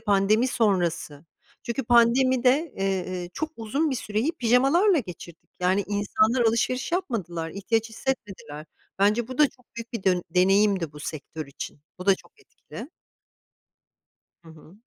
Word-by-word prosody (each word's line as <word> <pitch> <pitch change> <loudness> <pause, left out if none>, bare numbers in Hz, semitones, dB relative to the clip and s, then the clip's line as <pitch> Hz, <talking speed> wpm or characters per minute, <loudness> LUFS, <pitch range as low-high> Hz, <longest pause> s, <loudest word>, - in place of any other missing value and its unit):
pandemi 215 +3 +2
sonrası. 175 - 0 0.4
Çünkü 240 +2 -3
pandemide, 255 +5 +4
eee, 185 -2 -2
çok 315 - -3
uzun 275 +8 -1
bir 260 - -1
süreyi 220 +9 -1
pijamalarla 275 - +3
geçirdik. 170 - -9
Yani 185 +2 +2
insanlar 210 +4 +1
alışveriş 250 +6 -1
yapmadılar, 185 - -2
ihtiyaç 225 +5 -1
hissetmediler. 195 - -5 0.3
Bence 215 +4 +2
bu 255 - -7
da 295 -2 +6
çok 250 -2 -26
büyük 230 +1 -8
bir 225 -5 -4
dön 180 -2 +2
deneyimdi 190 -2 +3
bu 150 - -11
sektör 155 0 -6
için. 140 +1 -8 0.2
Bu 180 - -8
da 195 - +6
çok - - -18
etkili. 300 - -11 1.5
Hı 165 - -16
hı. 160 +4 -16
215 Hz, 135 wpm, -25 LUFS, 180-250 Hz, 1.5 s, da